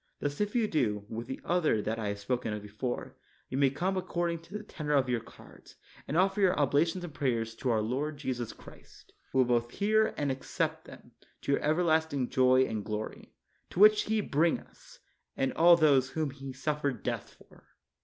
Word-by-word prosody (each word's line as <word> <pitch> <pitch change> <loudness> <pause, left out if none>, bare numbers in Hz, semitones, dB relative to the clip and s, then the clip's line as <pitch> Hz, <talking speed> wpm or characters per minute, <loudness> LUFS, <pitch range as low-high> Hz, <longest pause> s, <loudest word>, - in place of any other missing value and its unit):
Thus 145 +3 -3
if 210 +2 -1
you 230 -3 +3
do, 105 - 0
with 115 +1 -5
the 130 - -5
other 170 -10 +2
that 110 +2 -2
I 110 - -2
have 100 0 -2
spoken 115 +2 -2
of 105 -1 -5
before, 105 +5 -5 0.3
ye - - -4
may 140 0 +4
come 180 +8 -1
according 175 -2 -1
to 180 +5 -8
the 210 - -9
tenor 150 -7 -4
of 135 -2 +2
your 120 -1 +1
cards, 115 - -16 0.3
and 155 - -1
offer 195 +2 +2
your 185 -2 +4
obla 145 +3 +3
tions 180 +2 -4
and 170 -4 -7
prayers 115 -5 -1
to 130 - -2
our 110 -2 +2
Lord 140 +7 -2
Jesus 125 -4 -3
Christ, - - -16 0.2
who - - -2
will 130 - +5
both 120 -1 +1
hear 215 - +1
and 145 -2 0
accept 130 0 -3
them - - -14 0.3
to - - -2
your 140 - +2
everlast 160 0 +2
ing 130 -3 -1
joy 130 0 +4
and 110 -5 -3
glory; 105 0 -5 0.4
to - - -14
the 185 - +1
which 215 0 +8
He 220 0 +1
bring 160 -2 +1
us, - - -18 0.4
and 135 0 0
all 170 +1 +7
those 140 -5 +4
whom 155 -2 -2
He 135 0 -8
suffered 140 -3 -2
death - - -4
for. - - -21
140 Hz, 210 wpm, -30 LUFS, 125-170 Hz, 0.4 s, which